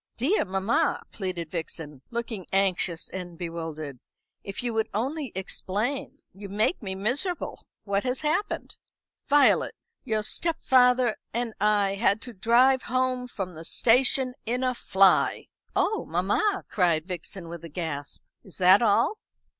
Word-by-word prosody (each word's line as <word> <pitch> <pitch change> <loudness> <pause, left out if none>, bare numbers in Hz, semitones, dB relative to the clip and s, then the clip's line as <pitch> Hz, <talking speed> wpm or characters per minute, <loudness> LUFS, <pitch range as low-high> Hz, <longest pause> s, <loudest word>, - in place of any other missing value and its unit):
"Dear 290 - +2
mamma," 200 - 0
pleaded 180 -5 -4
Vixen, 160 -4 -5
looking 230 -5 -4
anxious 190 -3 +1
and 175 -2 -7
bewildered, 160 -5 -5 0.4
"if 195 +4 -6
you 240 -1 -1
would 220 0 0
only 270 +4 -2
explain. 215 +8 -3 0.2
You 200 +1 -9
make 215 - 0
me 190 -3 -4
miserable. 260 - -1 0.2
What 200 0 0
has 255 0 -1
happened?" 315 +7 -2 0.5
"Violet, 285 0 +4 0.3
your 215 -1 0
stepfather 250 -4 +3 0.2
and 235 -1 -1
I 205 -2 +3
had 200 0 +2
to 245 - -7
drive 245 +6 +4
home 255 0 -1
from 190 -6 -5
the 160 0 -7
station 250 +6 +3
in 245 +3 -1
a 255 0 +1
fly!" 195 -5 +3 0.3
"Oh, 435 - +1
mamma!" 210 - +1
cried 170 -5 +1
Vixen, 180 0 -6
with 170 0 -8
a 165 - -8
gasp. 145 -3 -5 0.2
"Is 190 - -10
that 185 +3 +6
all?" 235 - +3
210 Hz, 140 wpm, -26 LUFS, 180-250 Hz, 0.5 s, that